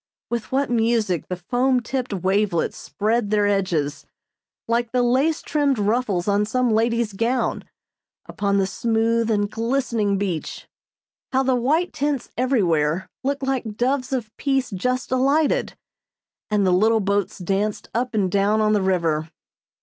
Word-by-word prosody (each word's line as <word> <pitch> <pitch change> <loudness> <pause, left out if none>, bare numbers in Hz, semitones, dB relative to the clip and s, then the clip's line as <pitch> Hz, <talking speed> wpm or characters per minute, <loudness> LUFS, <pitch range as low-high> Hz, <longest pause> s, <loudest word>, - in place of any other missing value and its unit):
With 235 -2 -3
what 270 0 0
music 225 -7 +1
the 180 - -3
foam 250 +8 +1
tipped 255 +1 -3
wavelets 190 -1 0
spread 215 +1 -1
their 210 -1 +2
edges, 180 -8 0 0.6
like 235 0 0
the 250 -1 +2
lace 265 +6 +1
trimmed 285 -3 +1
ruffles 210 -3 0
on 205 0 +2
some 245 +3 0
lady's 230 0 +1
gown, 235 +5 -1 0.6
upon 200 -1 -1
the 195 - +2
smooth 230 +3 0
and 205 -2 +1
glistening 230 -3 0
beach. 185 -5 -4 0.6
How 265 0 +2
the 260 0 +2
white 295 +9 +1
tents 285 -2 -2
everywhere 180 - +1
looked 275 +1 -1
like 250 -6 -2
doves 255 +1 0
of 235 -5 -3
peace 270 -3 0
just 250 +8 -2
alighted, 285 - +1 0.7
and 210 -2 +2
the 185 - +3
little 220 +4 +4
boats 200 -1 -1
danced 195 +3 -2
up 245 0 -1
and 190 -4 +1
down 200 +2 +2
on 215 0 +3
the 205 - +2
river. 165 -4 0
225 Hz, 145 wpm, -22 LUFS, 200-255 Hz, 0.7 s, little